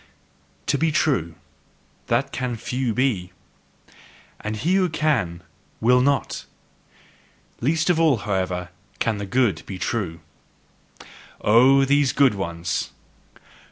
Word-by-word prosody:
To 140 - 0
be 160 0 +2
true 130 - 0 0.7
that 140 0 0
CAN 125 -2 -3
few 125 +2 -2
be! 110 -7 0 1.1
And 110 0 -4
he 145 +12 0
who 190 -2 +3
can, 115 - 0 0.4
will 125 +2 +4
not! 140 +1 0 1.1
Least 160 +6 +1
of 175 -3 +3
all, 155 -6 +4
however, 95 -4 -2 0.3
can 110 -3 -1
the 100 - -5
good 105 -5 +1
be 95 - -6
true. 90 -3 -3 1.2
Oh, 130 +5 +5
those 140 0 +2
good 140 -4 +4
ones! 85 -2 -3
120 Hz, 115 wpm, -23 LUFS, 95-140 Hz, 1.2 s, Oh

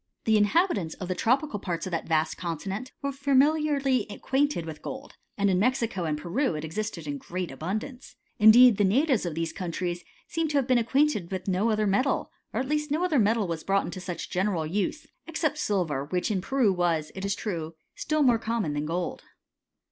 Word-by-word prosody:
The 220 - +3
inhabitants 210 - +2
of 185 -2 -7
the - - +1
tropical 250 - +1
parts 170 -4 -3
of 185 - -5
that 165 - -2
vast 160 -1 +1
continent 190 - -4
were 280 - 0
familiarly 280 -2 +2
acquainted 270 - 0
vith 155 -2 -8
gold; 265 +1 -7 0.2
and 200 0 +2
in 185 -2 +2
Mexico 230 -5 0
and 155 -1 -1
Peru 175 - -1
it 155 +1 -4
existed 170 0 -4
in 145 -1 -4
great 180 +3 -5
abundance; 215 - -5 0.2
indeed 220 +1 +8
the 205 - +3
natives 245 - +2
of 160 - -4
these 165 0 -2
countries 175 -1 -3 0.2
seem 330 -1 -1
to 295 -1 0
have 275 - +2
been 255 -1 +3
acquainted 250 - +1
with 190 0 -4
no 195 +4 +1
other 215 -1 +1
metal, 205 +8 +1 0.2
or - - -2
at 260 - -2
least 300 +1 -1
no 315 +5 +1
other 310 -7 +2
metal 215 -1 +2
was 165 -2 -4
brought 195 0 +1
into 185 +1 -6
such 180 -2 -6
general 185 -3 0
use, 200 - -2 0.2
except 305 -2 -1
silver, 165 - 0
which 180 +7 -1
in 190 -3 0
Peru 235 -1 +2
was, 170 -4 0
it 190 - -7
is 200 0 0
true, 165 -6 -4 0.2
still 305 -1 0
more 240 -4 +4
common 225 -9 -1
than 145 +1 -2
gold. 175 +2 -3
205 Hz, 200 wpm, -27 LUFS, 175-265 Hz, 0.2 s, indeed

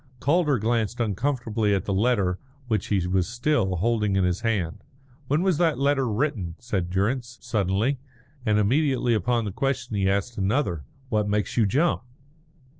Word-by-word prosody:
Calder 150 -2 +2
glanced 115 +1 0
uncomfortably 115 -1 0
at 95 - -2
the 100 - -1
letter 100 -4 +1 0.3
which 110 -3 0
he 95 -4 +1
was 90 -1 +1
still 120 -5 0
holding 105 +1 +1
in 95 - +2
his 90 0 0
hand. 100 -8 -1 0.4
"When 150 +6 +1
was 185 -5 +2
that 165 -5 +2
letter 135 -2 +2
written?" 105 - -1
said 95 -7 -3
Durrance, 120 +6 -1
suddenly; 110 +3 0 0.4
and 105 -3 +2
immediately 125 +3 +2
upon 115 +1 +1
the 100 - -3
question 135 0 -2
he 95 -1 +2
asked 100 +4 -1
another, 95 - 0 0.2
"What 105 -3 +1
makes 105 0 -1
you 115 -4 +3
jump?" 155 - +2
110 Hz, 160 wpm, -25 LUFS, 100-130 Hz, 0.4 s, you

